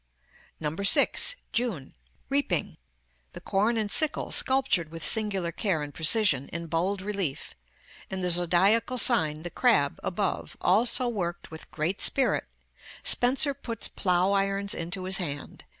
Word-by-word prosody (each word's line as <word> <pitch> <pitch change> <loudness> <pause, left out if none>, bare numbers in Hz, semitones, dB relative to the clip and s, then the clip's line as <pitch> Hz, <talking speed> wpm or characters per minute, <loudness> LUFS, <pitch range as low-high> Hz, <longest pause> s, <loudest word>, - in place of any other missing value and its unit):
6. 485 - +4 0.2
JUNE. 220 - -3 0.3
Reaping. 275 - -1 0.6
The - - -8
corn 210 +4 0
and 210 -2 -2
sickle 310 -2 0
sculptured 260 - +2
with 165 0 -8
singular 195 -6 0
care 170 -3 -2
and 145 0 -8
precision, 160 - +2
in 170 +1 -6
bold 180 +4 -2
relief, 195 -9 -3 0.6
and 190 -1 -4
the 180 - +1
zodiacal 185 +8 +2
sign, 160 -12 +2
the 175 - -6
Crab, 225 - +1
above, 190 +1 -3
also 230 +6 +2
worked 175 -9 -4
with 160 - -10
great 160 +5 -3
spirit. 270 - +2 0.6
Spenser 265 +3 +2
puts 235 -5 -2
plough 180 +1 0
irons 195 0 -1
into 175 +3 -4
his 190 +1 +1
hand. 145 -6 -6
195 Hz, 135 wpm, -26 LUFS, 170-225 Hz, 0.6 s, 6